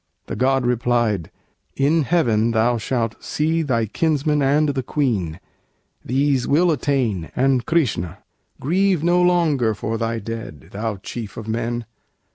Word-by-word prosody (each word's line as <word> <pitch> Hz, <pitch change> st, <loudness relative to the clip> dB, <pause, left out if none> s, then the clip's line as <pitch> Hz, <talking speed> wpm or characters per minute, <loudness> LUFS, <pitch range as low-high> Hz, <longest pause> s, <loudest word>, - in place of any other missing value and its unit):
The -, -, -5 dB
God 135 Hz, 0 st, +2 dB
replied: 120 Hz, -6 st, +1 dB, 0.5 s
"In 150 Hz, +4 st, +3 dB
heaven 120 Hz, -10 st, +2 dB
thou 115 Hz, +1 st, +2 dB
shalt 115 Hz, 0 st, -2 dB
see 160 Hz, +2 st, 0 dB
Thy 120 Hz, -7 st, 0 dB
kinsman 150 Hz, +4 st, 0 dB
and 145 Hz, +2 st, +3 dB
the 135 Hz, -2 st, -1 dB
Queen 110 Hz, -, -1 dB, 0.6 s
these 135 Hz, 0 st, +1 dB
will 170 Hz, +5 st, +4 dB
attain 125 Hz, -, 0 dB
And 130 Hz, -1 st, +2 dB
Krishna. 120 Hz, -, 0 dB, 0.4 s
Grieve 180 Hz, +2 st, +1 dB
no 175 Hz, +1 st, +3 dB
longer 155 Hz, -11 st, +2 dB
for 110 Hz, +2 st, -3 dB
thy 115 Hz, 0 st, -1 dB
dead, 110 Hz, -, -7 dB
Thou 110 Hz, +1 st, -3 dB
chief 115 Hz, -4 st, -6 dB
of 110 Hz, -, -7 dB
men! 115 Hz, +1 st, -2 dB
125 Hz, 135 wpm, -21 LUFS, 115-150 Hz, 0.6 s, will